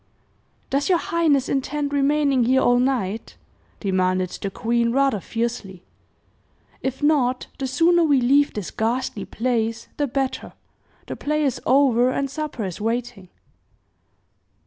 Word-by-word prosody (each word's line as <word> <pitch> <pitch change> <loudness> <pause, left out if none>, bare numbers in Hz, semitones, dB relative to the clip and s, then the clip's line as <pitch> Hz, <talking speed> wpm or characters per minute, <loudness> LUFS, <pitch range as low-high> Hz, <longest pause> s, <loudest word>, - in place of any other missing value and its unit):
"Does 280 +4 0
your 360 - +5
highness 320 -6 +1
intend 285 +1 -2
remaining 280 -2 +2
here 260 +2 +3
all 245 0 +4
night?" 230 -5 -1 0.4
demanded 185 -2 0
the 200 - -2
queen, 235 +3 0
rather 270 -4 +2
fiercely. 225 -3 -4 1.0
"If 265 +2 -4
not, 260 -4 +2
the 270 - -2
sooner 335 +6 +3
we 290 -4 +4
leave 280 +4 +3
this 205 -4 -4
ghastly 225 -2 -2
place 230 -1 -2
the 290 - 0
better. 270 0 -3 0.5
The - - -6
play 300 +1 -1
is 270 -4 -1
over, 255 -2 +4
and 275 +1 -2
supper 290 -6 -4
is 185 +1 -6
waiting." 230 -4 -3
255 Hz, 130 wpm, -22 LUFS, 230-280 Hz, 1.0 s, your